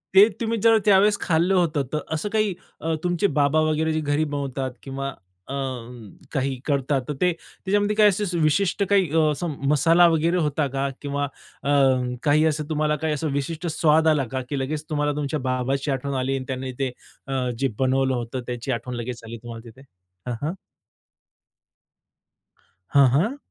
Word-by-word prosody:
ते 200 +3 +9
तुम्ही 230 0 0
जर 225 -1 +6
त्यावेळेस 205 +1 +5
खाल्लं 175 +3 +2
होतं, 160 -5 +2
तर 155 - +1
असं 170 +7 -2
काही 215 -3 +2 0.3
अ, 160 0 -1
तुमचे 175 +3 +1
बाबा 145 +2 +3
वगैरे 160 +1 0
जे 155 - 0
घरी 145 +1 +1
बनवतात 140 -3 -3
किंवा 135 0 -4 0.4
अ, - - -4 0.8
काही 135 -2 -1
करतात, 140 -1 +1
तर 150 - -2
ते 180 0 +4
त्याच्यामध्ये 205 +5 -2
काही 210 -1 +6
असे 185 -3 -1
विशिष्ट 180 +5 +2
काही 195 -6 +3 0.2
असं 155 +2 -3
अ, - - -11
मसाला 165 +4 +5
वगैरे 165 +2 +2
होता 150 -2 0
का 140 +1 +1
किंवा 145 0 -2 0.4
अ, 140 - -2 0.5
काही 155 +1 +4
असं 150 -1 -1
तुम्हाला 150 0 +1
काही 155 -1 +1 0.2
विशिष्ट 160 +5 -3
स्वाद 160 0 +3
आला 150 -4 +3
का 130 -1 -2
की 140 -2 -2
लगेच 150 +3 -3
तुम्हाला 145 -1 0
तुमच्या 150 +1 -2
बाबाची 130 +2 -1
आठवण 135 +1 -2
आली 135 +1 0
आणि 130 - -6
त्याने 130 0 -4
ते 130 -2 0 0.4
अ, 130 -2 -1
जे 135 - +2
बनवलं 130 0 +2
होतं, 120 +1 -4
त्याची 120 +2 -3
आठवण 120 +1 -3
लगेच 120 0 -5
आली 115 +1 -7
तुम्हाला 115 0 -9
तिथे? 130 +4 -16 0.5
हं, 120 - -2
हं. 165 - -2 2.4
हां, 140 -2 +7
हां. 205 - +1
150 Hz, 170 wpm, -24 LUFS, 135-170 Hz, 2.4 s, ते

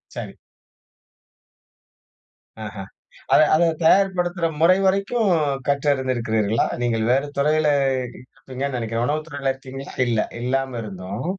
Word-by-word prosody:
சரி. - - -7 2.3
ஆஹ. 105 - -8 0.6
அத - - +7
அதத் 165 -1 +2
தயார்ப்படுத்துற 180 -1 +2 0.2
முறை 175 +3 +6
வரைக்கும் 200 +3 +1 0.4
கற்று 140 +1 0
அருந்திருக்கிறீர்களா? 115 -5 0 0.2
நீங்கள் 115 -2 0
வேற 135 +2 +3
துறையில 150 +2 +2 0.7
இருப்பீங்கன்னு 130 0 -5
நினைக்கிறேன். 115 0 -2
உணவு 155 +3 -1
துறையில 140 -3 -2
இருக்கீங்களா? 135 +1 -9 0.2
இல்ல 115 -3 +1 0.2
இல்லாம 130 0 -1
இருந்தும். 100 +3 -6
135 Hz, 105 wpm, -22 LUFS, 120-160 Hz, 2.3 s, அத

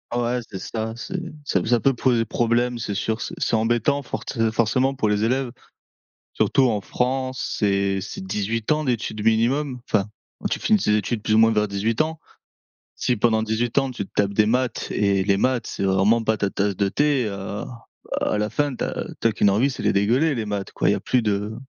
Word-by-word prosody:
Ouais 120 +1 0
c'est 95 - -7
ça, 110 0 -4
c'est 185 +10 -5 0.2
ça 95 -9 0
ça 120 +1 +3
peut 135 +2 +2
poser 120 -1 +2
problème, 120 +2 0
c'est 110 -3 -3
sûr. 110 +3 -1
C'est - - -5
c'est - - +1
embêtant 120 +5 +1
fortcé 115 -2 -2
forcément 120 +4 +1
pour 110 -5 0
les 105 0 +1
élèves. 130 +3 +1 0.8
Surtout 135 - +2
en 105 -3 0
France, 130 +4 -2
c'est 100 -2 +1
c'est 95 - -7
18 105 +5 -1
ans 155 0 0
d'études 110 -4 -2
minimum, 125 +5 +1
enfin, 100 -2 +1 0.3
où - - -2
tu - - -1
finis 215 -1 +3
tes 105 - +2
études 105 +1 -2
plus 110 - +1
ou - - +5
moins 115 0 +6
vers 105 -1 +1
18 105 +3 -1
ans. 160 0 0 0.7
Si 125 - 0
pendant 110 0 +2
18 110 +2 -1
ans, 135 -1 0
tu 100 -6 -5
te - - -32
tapes 100 0 +1
des 105 0 +4
maths 125 +3 0
et 100 -2 +1
les 100 0 +3
maths 125 +2 +1
c'est - - -5
vraiment 100 +4 +3
pas 110 0 +1
ta 100 -1 0
tasse 100 0 -1
de 100 +1 +1
thé, 140 +2 +1
heu, 100 0 -5 0.6
à - - 0
la 105 0 -1
fin 145 -2 0
tu - - -5
as - - -3 0.2
tu 115 - +3
as - - 0
qu'une 105 - +3
envie, 115 +8 +2
c'est 130 - -6
les - - +3
dégueuler 125 +10 +2
les 115 - -2
maths 105 -2 -4
quoi - - 0
il - - +4
y - - +2
a - - -5
plus 125 - +1
de 105 +1 -1
115 Hz, 220 wpm, -23 LUFS, 105-125 Hz, 0.8 s, moins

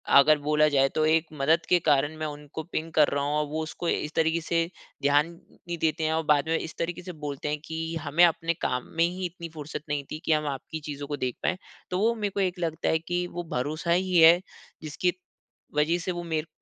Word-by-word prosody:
अगर 150 +2 +7
बोला 150 +1 +3
जाए 135 -2 +3
तो 155 - +3
1 160 +1 +3
मदद 155 +3 +2
के 180 - +5
कारण 145 +2 +3
मैं 155 - -3
उनको 150 +1 -7
पिंग 165 0 -4
कर 150 -2 +5
रहा 140 0 -1
हूँ 145 +1 0
और 150 - +1
वो 155 +2 -3
उसको 165 +2 -4
इस 150 +1 -1
तरीके 160 +1 +2
से 165 +1 +1 0.4
ध्यान 145 +2 +4 0.2
नहीं 175 0 -7
देते 160 0 0
हैं 155 0 +1
और 160 0 0
बाद 150 +1 +3
में 165 - +3
इस 160 - -6
तरीके 170 +1 -2
से 180 - -6 0.2
बोलते 140 +1 -4
हैं 150 0 -1
कि 160 0 -5 0.2
हमें 150 +4 +3
अपने 165 0 +1
काम 125 0 -1
में 165 - +5
ही 180 +2 -3
इतनी 170 -1 -6
फ़ुर्सत 150 -1 -6
नहीं 145 -1 -1
थी 155 - -4
कि - - +1
हम 150 -1 0
आपकी 145 +3 -5
चीज़ों 145 0 -5
को 145 - -3
देख 125 -3 -2
पाएँ। 185 - +1 0.3
तो 180 - 0
वो 225 +3 +3
मेरे 210 -2 -1
को - - 0
एक 180 -1 -1
लगता 165 -2 -1
है 160 - +2
कि 175 +2 -2
वो 175 - -2
भरोसा 155 +6 -1
ही 180 +1 +2
है 165 +1 +8 0.4
जिसकी 160 +4 -1 0.6
वजह 150 +3 +3
से 180 +2 -2
वो 175 -1 -4
मेरे 160 -1 -2
160 Hz, 240 wpm, -27 LUFS, 150-170 Hz, 0.6 s, है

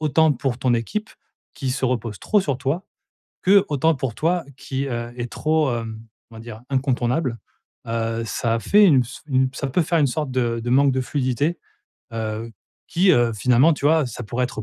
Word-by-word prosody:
autant 155 0 +3
pour 125 -1 -2
ton 125 -1 +2
équipe 210 - -3 0.5
qui 135 -4 -3
se 130 0 -2
repose 115 -4 -2
trop 210 - +2
sur 140 -7 -2
toi, 150 +8 -2 0.6
que 195 +1 +5
autant 155 +2 +2
pour 130 -4 -3
toi 170 +2 +1
qui, 135 0 -4
heu, 120 -1 -4
es 120 - -3
trop, 155 +1 0
hem, 115 -1 -5 0.3
on - - -11
va - - -9
dire 115 0 -10
incontournable. 130 0 0 0.5
Heu, 115 0 -2
ça 115 +1 -1
a 115 - -1
fait 205 - +5
une 145 -9 +6
ps 125 +2 -10
une 130 -2 +2
ps 130 - -10
ça 140 - -2
peut 160 +7 +1
faire 165 +1 +1
une 145 - +4
sorte 150 +1 -2
de 120 -2 0
de 120 +1 -3
manque 135 +1 +4
de 130 - 0
fluidité, 140 +5 -1 0.5
heu, 110 0 -4 0.4
qui, 185 +2 +3
heu, 120 -1 +3
finalement, 125 +8 +4
tu 140 - -8
vois, 155 -3 +3
ça 125 - -7
pourrait 125 +4 -1
être 110 -3 -5
130 Hz, 205 wpm, -22 LUFS, 120-150 Hz, 0.6 s, une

